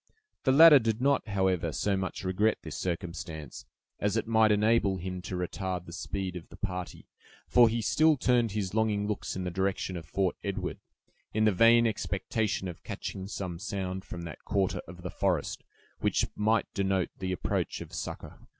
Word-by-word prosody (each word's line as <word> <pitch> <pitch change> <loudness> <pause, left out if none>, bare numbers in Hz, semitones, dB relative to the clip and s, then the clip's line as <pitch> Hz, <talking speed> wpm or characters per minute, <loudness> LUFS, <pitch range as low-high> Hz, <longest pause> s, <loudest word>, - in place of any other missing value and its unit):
The 130 - +5
latter 150 +1 +9
did 115 -2 -1
not, 140 -2 +2
however, 95 -5 +1
so 100 +5 0
much 95 0 -3
regret 100 +4 +2
this - - -6
circumstance, 85 -6 -5 0.3
as 105 +2 +1
it 115 - 0
might 110 -1 +4
enable 105 -2 +3
him 90 0 -5
to 90 - -5
retard 90 0 -3
the 85 - -10
speed 95 0 -4
of 90 - -8
the - - -13
party; 90 -3 -5 0.4
for 120 -2 +6
he 115 0 -1
still 155 +4 +4
turned 120 -4 +2
his 100 -3 -2
longing 105 -2 +1
looks 105 -1 -3
in 95 - -3
the 90 - -3
direction 95 0 -1
of 80 -3 -7
Fort 95 +1 0
Edward, 100 -2 -3 0.6
in 110 0 +3
the 110 - +5
vain 115 +4 +6
expectation 110 -2 -1
of 85 -3 -8
catching 95 -1 -5
some 90 -4 -5
sound 95 -2 -4
from 90 -2 -7
that 80 -4 -8
quarter 95 -2 0
of 90 +1 -11
the 90 - -4
forest, 90 -7 -1 0.4
which - - +1
might 110 +2 +2
denote 95 -2 0
the 95 0 -2
approach 90 - -2
of - - -9
succor. - - -6
95 Hz, 180 wpm, -29 LUFS, 90-110 Hz, 0.6 s, latter